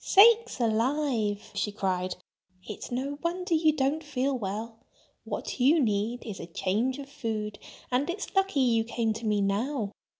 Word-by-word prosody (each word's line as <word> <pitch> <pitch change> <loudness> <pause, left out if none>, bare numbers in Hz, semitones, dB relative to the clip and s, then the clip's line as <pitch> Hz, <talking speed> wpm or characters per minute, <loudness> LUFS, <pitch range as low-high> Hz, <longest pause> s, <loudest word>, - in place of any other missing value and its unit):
"Sakes 455 - +6
alive!" 230 -2 0
she 205 +1 -1
cried. 185 -3 -1 0.5
"It's 210 - -7
no 275 +4 -2
wonder 355 +1 -1
you 315 -1 +5
don't 295 +2 0
feel 275 -2 -1
well! 220 +1 -4 0.5
What - - -4
you 285 +7 +5
need 225 -1 0
is 210 -5 -6
a - - -7
change 210 +9 0
of 280 -1 -7
food. 220 -7 -4 0.3
And 260 +6 +1
it's 400 +4 -4
lucky 385 -7 +2
you 230 -3 +3
came 230 -1 -1
to 225 +1 -5
me 210 -1 +2
now. 210 +3 0
245 Hz, 160 wpm, -28 LUFS, 210-285 Hz, 0.5 s, Sakes